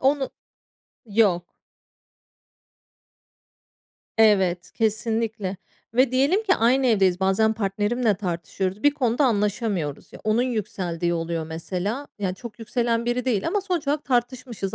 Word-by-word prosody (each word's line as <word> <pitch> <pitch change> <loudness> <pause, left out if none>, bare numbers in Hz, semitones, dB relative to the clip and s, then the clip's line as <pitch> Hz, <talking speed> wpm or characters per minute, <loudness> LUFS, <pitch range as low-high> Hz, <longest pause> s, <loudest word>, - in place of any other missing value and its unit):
onu 270 0 +2 0.8
Yok. 200 -5 +1 2.6
Evet, 190 -5 +3
kesinlikle. 220 -3 -1 0.4
Ve 255 +1 +4
diyelim 285 +12 +3
ki 385 -3 +3
aynı 255 +3 +3
evdeyiz, 195 -5 +3
bazen 195 +3 +3
partnerimle 215 +2 0
tartışıyoruz. 185 +1 -3
Bir 290 - +6
konuda 265 -1 +1
anlaşamıyoruz. 205 - -1
Ya, - - -11
onun 215 +3 +2
yükseldiği 190 -8 -2
oluyor 165 -1 -2
mesela. 185 - -3
Ya, 190 -3 -1
çok 230 +2 -10
yükselen 235 0 0
biri 240 +1 -1
değil 220 -6 0
ama 410 +3 +1
sonuç 360 -6 -2
olarak 295 +1 0
tartışmışız, 245 -5 -2
220 Hz, 120 wpm, -24 LUFS, 190-250 Hz, 2.6 s, Bir